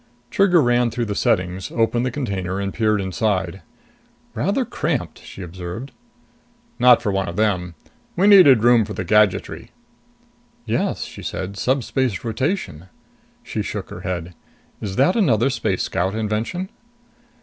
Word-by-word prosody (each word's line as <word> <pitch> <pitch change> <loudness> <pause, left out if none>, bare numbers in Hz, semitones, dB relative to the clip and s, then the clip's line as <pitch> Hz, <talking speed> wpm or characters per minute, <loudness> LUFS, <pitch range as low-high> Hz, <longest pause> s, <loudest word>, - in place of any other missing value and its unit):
Trigger 180 -5 +4
ran 120 0 +2
through 120 +1 -2
the 105 - -3
settings, 95 -5 0
opened 120 +1 +1
the 130 - 0
container 100 -9 -3
and 100 -1 -3
peered 110 -2 +1
inside. 95 -1 -1 0.7
"Rather - - 0
cramped," - - -3
she 95 - -10
observed. 90 +8 -7 0.9
"Not 120 -1 +6
for 105 - 0
one 95 -1 -1
of 85 - -5
them. 90 -5 0 0.4
We 185 - +2
needed 180 - +7
room 120 -1 +5
for 105 +1 -6
the 95 - -4
gadgetry." 105 +1 +1 1.0
"Yes," - - -1
she - - -10
said. 95 +2 -5
"Subspace 130 -2 -1
rotation." 115 - -3 0.6
She - - -4
shook - - -5
her - - -8
head. 90 -1 -4 0.5
"Is 95 -3 -4
that 140 - +3
another 135 - +2
Space 125 - -1
Scout 95 +4 -1
invention?" 110 - -2
110 Hz, 140 wpm, -21 LUFS, 95-125 Hz, 1.0 s, needed